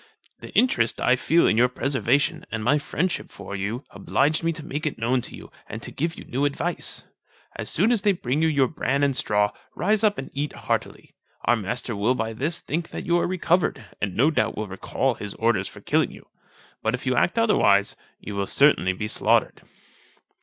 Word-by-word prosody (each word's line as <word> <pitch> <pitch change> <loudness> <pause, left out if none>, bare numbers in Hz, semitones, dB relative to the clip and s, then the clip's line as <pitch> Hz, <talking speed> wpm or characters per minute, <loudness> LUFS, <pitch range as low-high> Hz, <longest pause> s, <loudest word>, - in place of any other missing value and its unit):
"The - - -10
interest 120 - +2
I 125 - +4
feel 165 +6 +3
in 110 - +3
your 125 +2 +5
preservation, 135 +5 +1
and 110 -1 -4
my 140 +6 +3
friendship 175 +5 -2
for 100 0 -8
you, 105 +7 -3
obliged 150 +4 +1
me 165 - +2
to 155 -1 -8
make 150 +3 -3
it 150 - -3
known 125 +3 +1
to - - -6
you, - - -12 0.2
and 110 - -5
to - - -4
give 165 +4 -2
you - - -9
new 130 +3 -2
advice. 145 +4 -1 0.5
As - - -3
soon 205 +9 +3
as 235 -4 +2
they 205 - +4
bring 145 -3 -1
you 160 - +4
your 140 -4 +3
bran 140 -1 -1
and 140 -2 +2
straw, 105 -4 +2 0.2
rise 210 +5 +1
up 210 -1 +3
and 135 - -6
eat 145 +2 -2
heartily. - - -3 0.3
Our - - +4
master 115 +2 -3
will 110 +6 +1
by 115 -2 -2
this 145 +9 -1
think 165 +2 -3
that - - -6
you 175 0 +3
are - - 0
recovered, 175 -1 0 0.2
and 100 -3 -2
no 140 +7 +4
doubt 115 -7 0
will 105 0 -3
recall 110 +7 -1
his 105 -3 -6
orders 110 -4 +1
for - - -11
killing - - +1
you; - - -14 0.5
but, 110 +2 +1
if 125 - -9
you 130 -1 +1
act 175 - +2
otherwise, 100 - +3 0.2
you 105 - -7
will 100 -1 -2
certainly 140 -10 +4
be 105 +3 -4
slaughtered." - - +1
135 Hz, 210 wpm, -24 LUFS, 110-160 Hz, 0.5 s, your